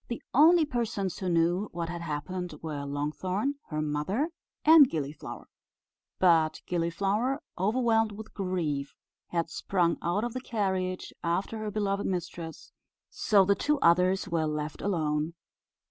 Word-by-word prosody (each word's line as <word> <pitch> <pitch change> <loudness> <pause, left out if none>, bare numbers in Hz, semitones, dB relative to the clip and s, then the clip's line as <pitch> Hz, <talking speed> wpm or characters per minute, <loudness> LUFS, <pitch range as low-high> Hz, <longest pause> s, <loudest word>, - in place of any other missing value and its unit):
The 235 - -5
only 320 +4 +6
persons 230 - -2
who 185 - -2
knew 175 +4 +2
what 170 -1 -3
had 170 0 -5
happened 170 +2 -4
were 145 -3 -4
Longthorn, 185 - -2
her 155 -1 -2
mother, 170 - -1 0.3
and 310 -4 +9
Gilliflower; 150 -2 -5 0.7
but 165 -4 +3
Gilliflower, 195 - 0 0.2
overwhelmed 225 +2 +2
with 215 +1 -10
grief, 170 -8 -2 0.3
had 170 -2 -2
sprung 175 -2 0
out 175 +5 0
of 240 -1 -2
the 255 - -4
carriage 190 -6 -2
after 185 +6 -1
her 215 -1 -3
beloved 200 -1 -1
mistress; 175 -3 -5 0.4
so 200 -3 +4
the 200 - +4
two 295 +8 +1
others 180 +3 +4
were 160 -2 0
left 150 0 -4
alone. 155 -4 -1
185 Hz, 135 wpm, -29 LUFS, 165-215 Hz, 0.7 s, and